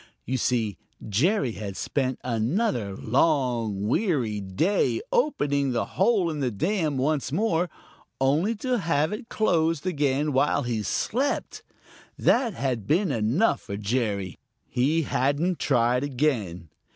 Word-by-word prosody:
You 130 Hz, -, -1 dB
see 115 Hz, -6 st, 0 dB, 0.3 s
Jerry 135 Hz, -, +2 dB
had 100 Hz, -3 st, -6 dB
spent 130 Hz, -2 st, -1 dB
another 120 Hz, -, -1 dB
long, 120 Hz, -6 st, +1 dB
weary 125 Hz, -, 0 dB
day 130 Hz, -, +1 dB
opening 145 Hz, -, +1 dB
the 115 Hz, -, 0 dB
hole 190 Hz, -3 st, +2 dB
in 150 Hz, -, -4 dB
the 130 Hz, -3 st, 0 dB
dam 155 Hz, -, -1 dB
once 140 Hz, +1 st, 0 dB
more, 175 Hz, -1 st, +1 dB, 0.5 s
only 155 Hz, +12 st, +2 dB
to 250 Hz, +2 st, -1 dB
have 160 Hz, -1 st, +1 dB
it 220 Hz, +2 st, -7 dB
closed 165 Hz, -6 st, +1 dB
again 145 Hz, -3 st, 0 dB
while 140 Hz, +3 st, +2 dB
he 120 Hz, -3 st, -1 dB
slept. 255 Hz, -, -1 dB, 0.6 s
That 235 Hz, -5 st, +2 dB
had 125 Hz, -7 st, -2 dB
been 175 Hz, +2 st, +2 dB
enough 120 Hz, -, +1 dB
for 100 Hz, -2 st, -6 dB
Jerry. 105 Hz, -3 st, -2 dB, 0.3 s
He 150 Hz, +6 st, +1 dB
hadn't 145 Hz, +6 st, 0 dB
tried 120 Hz, +2 st, +2 dB
again. 120 Hz, -, -1 dB
140 Hz, 125 wpm, -26 LUFS, 115-170 Hz, 0.6 s, Jerry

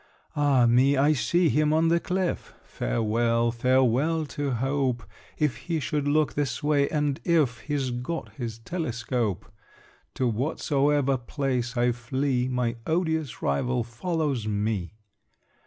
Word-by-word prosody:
Ah 140 Hz, -4 st, +4 dB
me! 130 Hz, +4 st, +4 dB
I 145 Hz, +3 st, +4 dB
see 170 Hz, +5 st, +2 dB
him 150 Hz, 0 st, +2 dB
on 160 Hz, +1 st, +3 dB
the 170 Hz, +1 st, +3 dB
cliff! 185 Hz, +1 st, -2 dB
Farewell, 115 Hz, -, 0 dB
farewell 130 Hz, +6 st, +2 dB
to 145 Hz, -1 st, -3 dB
hope, 130 Hz, -1 st, 0 dB, 0.3 s
If 150 Hz, -4 st, 0 dB
he 165 Hz, -2 st, -3 dB
should 145 Hz, +1 st, -2 dB
look 150 Hz, +1 st, +2 dB
this 140 Hz, -1 st, -2 dB
way, 145 Hz, -1 st, +2 dB
and 150 Hz, -3 st, -1 dB
if 150 Hz, -9 st, +2 dB
He's 135 Hz, +2 st, -2 dB
got 125 Hz, +8 st, -4 dB
his 115 Hz, -5 st, -5 dB
telescope! 120 Hz, -, -2 dB, 0.7 s
To 130 Hz, -, 0 dB
whatsoever 140 Hz, +2 st, +1 dB
place 125 Hz, -1 st, -2 dB
I 120 Hz, +1 st, +3 dB
flee, 125 Hz, +2 st, -1 dB
My 125 Hz, -2 st, -1 dB
odious 160 Hz, -4 st, -1 dB
rival 120 Hz, -, 0 dB
follows 135 Hz, -, -2 dB
me! 105 Hz, -2 st, -2 dB
130 Hz, 130 wpm, -26 LUFS, 120-150 Hz, 0.7 s, Ah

